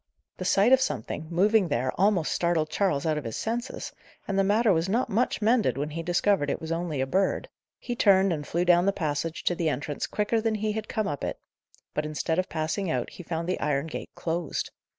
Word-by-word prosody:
The 185 - -5
sight 200 +7 +4
of 265 - +6
something, 135 - -3
moving 195 +3 +3
there, 130 -4 0
almost 190 -4 +2
startled 170 -3 +1
Charles 175 -8 +1
out 155 -2 +1
of - - -9
his 115 -2 -4
senses, 235 +2 -4 0.3
and 195 -1 0
the - - +4
matter 210 +2 +3
was 165 +2 0
not 235 +6 0
much 225 +1 +1
mended 215 - +3
when 145 +2 -2
he 165 +2 -4
discovered 175 -2 +1
it - - -1
was 160 0 -6
only 165 -4 -1
a - - +1
bird. 190 +8 0 0.3
He 240 - -4
turned, 195 -4 +4
and 150 -2 -5
flew 175 +2 0
down 175 +1 +5
the 200 - +3
passage 160 -2 -2
to - - +2
the 165 -2 0
entrance 145 +1 -3
quicker 215 +2 0
than 225 -1 0
he 215 0 -1
had 215 0 -4
come 215 -2 -1
up 145 -2 -4
it; - - -2 0.6
but, 150 - -1
instead 160 +2 -1
of 185 - -1
passing 165 +4 -2
out, 125 -5 -1
he - - -10
found 165 -1 -4
the 185 - -1
iron 145 -1 0
gate 165 - -6
closed. 165 -1 -3
175 Hz, 225 wpm, -27 LUFS, 155-205 Hz, 0.6 s, of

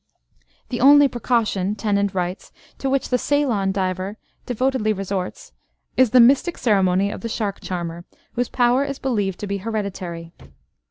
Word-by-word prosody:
"The 240 -2 -3
only 285 +2 +7
precaution," 225 -5 0
Tennent 200 -2 0
writes, 180 0 -3 0.3
"to 270 - -1
which 275 0 0
the 250 - +1
Ceylon 240 -10 +1
diver 190 +1 -2 0.3
devotedly 250 -2 0
resorts 195 -2 -5 0.4
is 255 -2 +4
the 250 - +5
mystic 275 +8 +4
ceremony 195 -3 +2
of - - -7
the 230 - -4
shark 210 -3 -3
charmer, 175 -1 -5 0.3
whose 245 0 -1
power 245 +2 +2
is 280 -1 -4
believed 205 -9 -1
to - - -3
be 200 0 -2
hereditary. 185 -5 -5
210 Hz, 150 wpm, -22 LUFS, 190-250 Hz, 0.4 s, only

